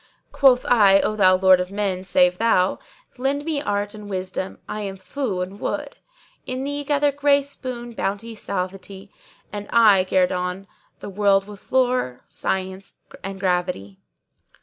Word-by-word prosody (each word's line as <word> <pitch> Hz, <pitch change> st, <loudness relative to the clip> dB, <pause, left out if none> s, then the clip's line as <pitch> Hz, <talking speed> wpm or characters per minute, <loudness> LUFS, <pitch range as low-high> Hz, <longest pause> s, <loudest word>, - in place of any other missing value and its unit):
Quoth 260 Hz, -1 st, +4 dB
I, 200 Hz, -5 st, +5 dB
'O 215 Hz, -, 0 dB
thou 185 Hz, -3 st, +5 dB
Lord 185 Hz, 0 st, +5 dB
of 180 Hz, 0 st, -3 dB
men, 195 Hz, -2 st, -2 dB
save 180 Hz, -1 st, +2 dB
thou 195 Hz, -5 st, +2 dB, 0.2 s
* -, -, -32 dB
Lend 280 Hz, +3 st, -1 dB
me 310 Hz, -3 st, -1 dB
art 205 Hz, -6 st, -2 dB
and 210 Hz, -1 st, -10 dB
wisdom 185 Hz, 0 st, -4 dB
I'm 200 Hz, -2 st, -5 dB
fou 190 Hz, +1 st, -3 dB
and 190 Hz, +3 st, -6 dB
wood 290 Hz, -1 st, -4 dB, 0.5 s
In 255 Hz, +1 st, -3 dB
thee 285 Hz, +1 st, -3 dB
gather 290 Hz, 0 st, +2 dB
grace, 280 Hz, 0 st, +1 dB
boon, 240 Hz, -2 st, -6 dB
bounty, 205 Hz, +2 st, -3 dB
suavity, 195 Hz, 0 st, -6 dB, 0.2 s
* -, -, -31 dB
And 205 Hz, 0 st, -6 dB
I 210 Hz, -5 st, +6 dB
guerdon 180 Hz, 0 st, 0 dB, 0.4 s
the -, -, -6 dB
world 195 Hz, 0 st, +2 dB
with 205 Hz, -2 st, -13 dB
lore, 250 Hz, -, +1 dB
science 190 Hz, +1 st, -4 dB, 0.3 s
and 195 Hz, 0 st, -6 dB
gravity.' 180 Hz, -, -2 dB
200 Hz, 150 wpm, -22 LUFS, 185-250 Hz, 0.5 s, I